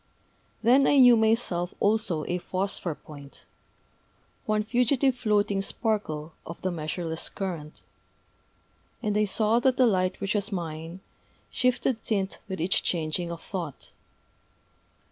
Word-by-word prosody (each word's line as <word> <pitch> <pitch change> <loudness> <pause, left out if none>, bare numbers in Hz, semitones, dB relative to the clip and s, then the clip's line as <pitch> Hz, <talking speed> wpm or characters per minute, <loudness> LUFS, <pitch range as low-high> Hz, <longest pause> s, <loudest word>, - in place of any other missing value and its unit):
Then 260 +4 +5
I 285 - +4
knew 245 -2 +8
myself 220 -6 +1
also 205 -7 +1
a 180 +1 -1
phosphor 185 -3 -3
point, 140 -2 -13 1.0
one 215 0 +1
fugitive 250 +3 +2
floating 210 -4 +1
sparkle 180 -8 -2
of 170 - -9
the 185 - 0
measureless 160 0 -3
current; 170 -6 -6 1.2
and 210 -2 0
I 210 0 +3
saw 215 +3 +2
that 255 +1 +2
the 255 - +5
light 185 -4 +1
which 195 -1 -1
was 205 +1 -1
mine 165 0 -5 0.5
shifted 250 -2 0
tint 195 -3 -1
with 190 -1 -5
each 175 +4 +2
changing 170 +1 -1
of 170 -1 -7
thought. 170 -8 -6
195 Hz, 125 wpm, -27 LUFS, 170-220 Hz, 1.2 s, knew